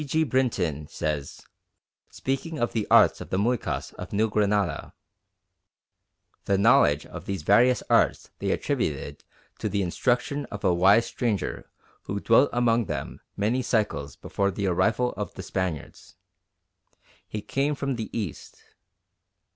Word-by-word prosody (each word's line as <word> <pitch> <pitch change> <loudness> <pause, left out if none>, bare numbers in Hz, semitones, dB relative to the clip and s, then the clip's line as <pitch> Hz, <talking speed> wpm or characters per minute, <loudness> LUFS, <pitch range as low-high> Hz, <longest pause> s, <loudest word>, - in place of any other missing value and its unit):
G. 155 +3 +1
Brinton 110 - 0
says, 75 -3 -4 0.6
speaking 135 +5 -3
of 120 -3 -1
the 110 -3 -1
arts - - +5
of - - -8
the 95 - -1
Muycas 115 +3 -1
of - - -7
New 110 +1 +1
Granada, 100 -5 0 1.5
"The 100 - +2
knowledge 100 - +4
of - - -10
these 95 -5 -3
various 120 +8 +4
arts - - +2
they - - -2
attributed - - -2 0.4
to - - -2
the 100 -1 0
instruction 125 +9 0
of 105 - -8
a 90 - +3
wise 100 +6 +5
stranger 115 -5 -3 0.4
who 100 - -3
dwelt 115 +7 +4
among 120 -1 +2
them - - -5 0.2
many 110 +6 +1
cycles 105 - -1
before 100 0 -1
the 100 +1 -3
arrival 100 +7 +1
of - - -5
the - - -7
Spaniards. 80 -5 -4 1.1
He 105 -1 -5
came 140 +2 0
from 135 -1 -2
the 115 -2 -5
East.... 100 -9 -6
105 Hz, 140 wpm, -26 LUFS, 95-125 Hz, 1.5 s, arts